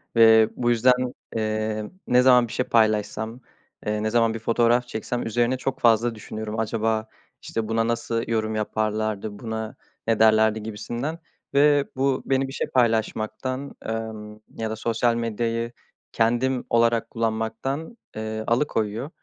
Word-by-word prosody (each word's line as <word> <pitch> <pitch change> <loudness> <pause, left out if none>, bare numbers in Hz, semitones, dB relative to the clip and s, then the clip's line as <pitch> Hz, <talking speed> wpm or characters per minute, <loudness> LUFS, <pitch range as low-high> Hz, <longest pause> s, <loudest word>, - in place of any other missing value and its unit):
ve 110 -1 +7
bu 120 -1 0
yüzden, 125 +1 +3 0.2
ımm, 110 +1 -2
ne 125 0 +5
zaman 125 -2 +6
bir 115 - -9
şey 125 - 0
paylaşsam, 110 +1 +1 0.5
eee, 105 0 -1
ne 110 - +1
zaman 115 0 +2
bir 115 - -5
fotoğraf 120 +2 +2
çeksem 120 +1 -3
üzerine 120 +3 +1
çok 130 +1 -3
fazla 115 0 +3
düşünüyorum. 110 0 -6
"Acaba, 110 0 0 0.3
işte, 115 -1 -3
buna 115 0 +1
nasıl 115 0 -1
yorum 110 -1 -1
yaparlardı, 110 -1 -2
buna 110 +1 -5 0.3
ne 115 -1 +2
derlerdi?" 110 0 +4
gibisinden 120 +8 -4 0.3
ve 145 0 +5
bu 135 0 +1
beni 135 0 +1
bir 135 - -8
şey - - -2
paylaşmaktan, 120 +3 -1
ımm, 110 -1 -5 0.2
ya 110 -1 -2
da 110 - -3
sosyal 115 +1 +1
medyayı 115 0 -2 0.4
kendim 120 +3 +1
olarak 115 0 +2
kullanmaktan, 115 - -3 0.2
ııı, 110 0 -3
alıkoyuyor. 115 -1 0
115 Hz, 140 wpm, -24 LUFS, 110-120 Hz, 0.5 s, ve